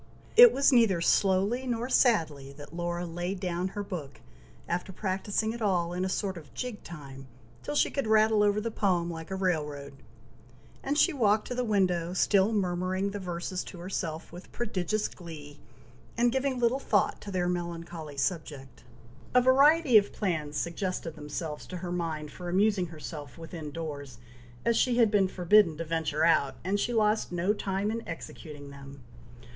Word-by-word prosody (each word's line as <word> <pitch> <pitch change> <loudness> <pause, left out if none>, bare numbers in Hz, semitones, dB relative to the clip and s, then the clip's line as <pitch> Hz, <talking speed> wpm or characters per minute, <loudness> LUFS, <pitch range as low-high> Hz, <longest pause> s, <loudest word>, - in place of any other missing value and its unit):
It 485 0 +10
was 275 +1 +3
neither 225 -8 +4
"slowly 200 +8 +2
nor 240 0 -1
sadly" 160 - +2
that 145 +2 -12
Laura 175 0 -2
"laid 175 +3 -4
down" 180 -1 -2
her 205 +2 -5
book, 155 -9 -7 0.5
after 180 +2 -2
practising 205 +3 -2
it 235 - -8
all, 175 -5 +1
in 180 +1 -2
a 190 - -1
sort 190 -1 -2
of 150 -3 -16
jig 250 -4 -5
time, 135 -5 -10 0.3
till 295 - -4
she - - +3
could 275 -5 -2
rattle 215 0 +4
over 205 0 +3
the 230 +2 -3
poem 180 -5 0
like 160 -1 -7
a 190 - -3
rail 180 -5 +1
road, 140 -1 -8 0.9
and 285 +2 -1
she 355 - +4
walked 215 -5 +2
to - - -2
the 250 0 -1
window, 185 -5 +1
still 195 +2 +3
murmuring 185 -1 -1
the 205 - -5
verses 180 0 -4
to 185 - -9
herself 170 -2 -4
with 175 +2 -11
prodigious 210 -2 -1
glee, 150 -4 -11 0.6
and 240 0 +3
giving 265 0 0
little 245 +2 +2
thought 205 -7 +1
to 205 - -8
their 180 -2 0
melancholy 170 -4 -5
subject. 140 -4 -3 0.5
A - - +9
variety 275 0 +6
of 200 - -5
plans 155 -7 -2
suggested 170 -1 -3
themselves 150 0 -6
to 180 - -6
her 175 0 -5
mind 160 -4 -3
for 180 -1 -7
amusing 195 0 +2
herself 155 -2 -8
within 165 -2 -7
doors, 145 -5 -6 0.5
as 235 - +3
she 240 +1 +2
had 230 -4 +4
been 200 -3 +3
forbidden 180 -2 +4
to 165 - -4
venture 160 -1 0
out, 140 -5 +3
and 195 +4 0
she 240 - 0
lost 215 -3 +1
no 180 +4 +1
time 200 0 -2
in 230 +1 -3
executing 150 -3 -8
them. 140 -1 -12
180 Hz, 175 wpm, -29 LUFS, 165-210 Hz, 0.9 s, It